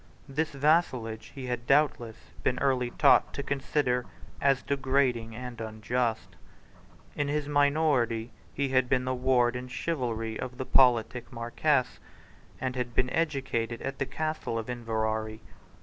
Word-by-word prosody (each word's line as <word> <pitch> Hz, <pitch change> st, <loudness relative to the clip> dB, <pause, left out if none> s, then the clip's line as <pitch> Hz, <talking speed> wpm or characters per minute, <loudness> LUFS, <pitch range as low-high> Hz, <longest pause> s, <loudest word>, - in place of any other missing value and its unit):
This 150 Hz, +4 st, -1 dB
vassalage 130 Hz, -7 st, +1 dB
he 135 Hz, -2 st, -6 dB
had 120 Hz, -1 st, -4 dB
doubtless 135 Hz, -6 st, +2 dB, 0.2 s
been 125 Hz, -, +1 dB
early 130 Hz, -3 st, +1 dB
taught -, -, +4 dB
to 140 Hz, -, -3 dB
consider 135 Hz, -2 st, 0 dB, 0.3 s
as 135 Hz, -2 st, +3 dB
degrading 130 Hz, -5 st, 0 dB
and 125 Hz, -1 st, -7 dB
unjust. 110 Hz, +1 st, -2 dB, 0.8 s
In 145 Hz, -, 0 dB
his 145 Hz, 0 st, -1 dB
minority 140 Hz, -6 st, +2 dB, 0.2 s
he 140 Hz, -1 st, -1 dB
had 130 Hz, -1 st, +2 dB
been 125 Hz, -1 st, +2 dB
the 130 Hz, -, 0 dB
ward 125 Hz, -1 st, +2 dB
in 125 Hz, +1 st, -5 dB
chivalry 120 Hz, -5 st, -3 dB
of 125 Hz, -1 st, -5 dB
the 130 Hz, -, -3 dB
politic 125 Hz, -2 st, +3 dB
Marquess, 125 Hz, +3 st, 0 dB, 0.6 s
and 130 Hz, 0 st, -2 dB
had 120 Hz, -2 st, -3 dB
been 125 Hz, -, +1 dB
educated 135 Hz, -7 st, -1 dB
at 135 Hz, 0 st, -4 dB
the 135 Hz, -, -1 dB
Castle 155 Hz, -7 st, -3 dB
of 115 Hz, +2 st, -3 dB
Inverary. 110 Hz, -2 st, -2 dB
125 Hz, 140 wpm, -29 LUFS, 115-140 Hz, 0.8 s, taught